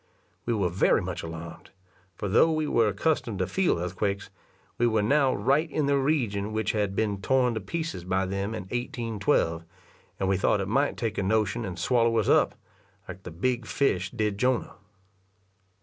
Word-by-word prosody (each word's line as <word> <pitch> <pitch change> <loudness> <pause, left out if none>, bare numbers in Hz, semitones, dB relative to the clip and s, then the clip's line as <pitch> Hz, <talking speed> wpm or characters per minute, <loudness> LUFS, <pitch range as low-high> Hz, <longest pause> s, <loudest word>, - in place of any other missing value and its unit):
We 120 - +2
were 100 -4 +1
very 90 - +3
much - - -4
alarmed; 80 0 -8 0.5
for 105 - -4
though 115 +11 +4
we 155 -1 0
were 115 -6 +3
accustomed 115 - 0
to 95 - 0
feel 185 - +1
earthquakes, 100 +3 -3 0.5
we 120 - +4
were 110 -2 +2
now 140 +4 +3
right 140 +10 +1
in 150 0 0
the 140 0 +2
region 115 -8 0
which 110 -2 0
had 105 -3 -1
been 100 -2 -1
torn 125 0 +2
to 110 - -3
pieces 160 - -4
by 95 +1 0
them 100 +3 -3
in - - -5
1812, 115 - -1 0.6
and 95 - 0
we 95 0 +2
thought 100 +2 +2
it 95 - -2
might 135 +7 +1
take 110 -3 -2
a - - +1
notion 110 +3 0
and 90 -2 -5
swallow 115 +4 +2
us 110 - +1
up, - - +4 0.5
like 95 - -8
the - - -8
big 120 +9 -1
fish 95 -10 0
did 105 -1 -2
Jonah. 125 0 +1
110 Hz, 180 wpm, -27 LUFS, 95-130 Hz, 0.6 s, though